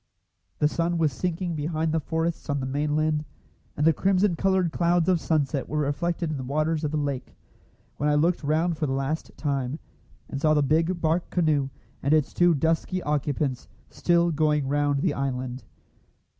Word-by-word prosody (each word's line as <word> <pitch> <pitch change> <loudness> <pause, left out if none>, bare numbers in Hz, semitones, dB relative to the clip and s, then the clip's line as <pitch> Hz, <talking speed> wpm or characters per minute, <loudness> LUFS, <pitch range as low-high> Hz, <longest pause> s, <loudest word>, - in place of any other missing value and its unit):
The 150 - +3
sun 170 +2 0
was 155 -4 +1
sinking 175 +3 -2
behind 155 +1 -1
the 160 - +1
forests 165 +2 -2
on 140 0 0
the 130 - -3
mainland, 150 +2 0 0.5
and 150 - +1
the 165 - +6
crimson 190 +1 +2
coloured 190 -1 +1
clouds 170 0 +2
of 185 -2 +3
sunset 145 -3 0
were 150 - -2
reflected 155 +3 -1
in 150 - -3
the 130 - -5
waters 155 +4 0
of 150 - 0
the 155 - -2
lake, 140 -3 -3 0.6
when 150 - +1
I 150 - +3
looked 165 +3 +2
round 160 +3 +1
for 155 - 0
the 135 - -1
last 135 +4 -2
time, 140 -2 -2 0.5
and 140 - -5
saw 155 0 +4
the 150 - +3
big 165 +5 +1
bark 165 +2 +1
canoe 155 -6 +1 0.3
and 140 +3 +3
its 155 -3 +1
two 175 -1 +4
dusky 165 +5 0
occupants 145 -3 -1 0.2
still 170 0 +2
going 150 -2 +1
round 145 0 +1
the 170 - +2
island. 130 -2 -3
155 Hz, 180 wpm, -26 LUFS, 145-165 Hz, 0.6 s, the